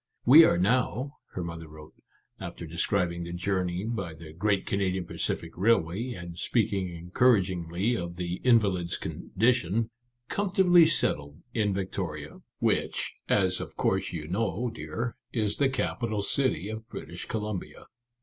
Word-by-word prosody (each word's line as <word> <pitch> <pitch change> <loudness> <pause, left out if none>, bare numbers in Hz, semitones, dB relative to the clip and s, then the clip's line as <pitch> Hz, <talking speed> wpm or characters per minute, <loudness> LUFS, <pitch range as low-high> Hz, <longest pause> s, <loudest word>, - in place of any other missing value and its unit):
" - - -47
We 165 - +12
are - - +3
now," 125 +7 +1 0.2
her 90 - -3
mother 85 -1 -6
wrote, 75 0 -13 0.5
after 85 0 -6
describing 85 +1 0
the 85 0 -6
journey 90 0 -1
by 110 -8 -3
the 80 -1 -11
great 100 +3 +1
Canadian 95 -2 0
Pacific - - -2
Railway, 110 +3 +1
and 85 -4 -8
speaking 100 -5 +1
encouragingly 90 +2 +1
of 85 -4 -4
the 90 0 -3
invalid's 100 -8 +3
condition, 110 0 0 0.2
" 120 0 -51
comfortably 185 -3 +5
settled 75 - -1
in 105 -3 +1
Victoria 90 -6 -4
— - - -64
which, - - 0 0.2
as 95 -2 +3
of - - -7
course - - +1
you 80 -3 -5
know, 110 +5 -1
dear, 120 +1 -4 0.2
is 110 -4 0
the 140 -2 +3
capital 115 -5 -1
city 115 - +1
of 110 +2 -7
British 85 -5 -7
Columbia. 105 -4 -4
95 Hz, 145 wpm, -28 LUFS, 85-115 Hz, 0.5 s, We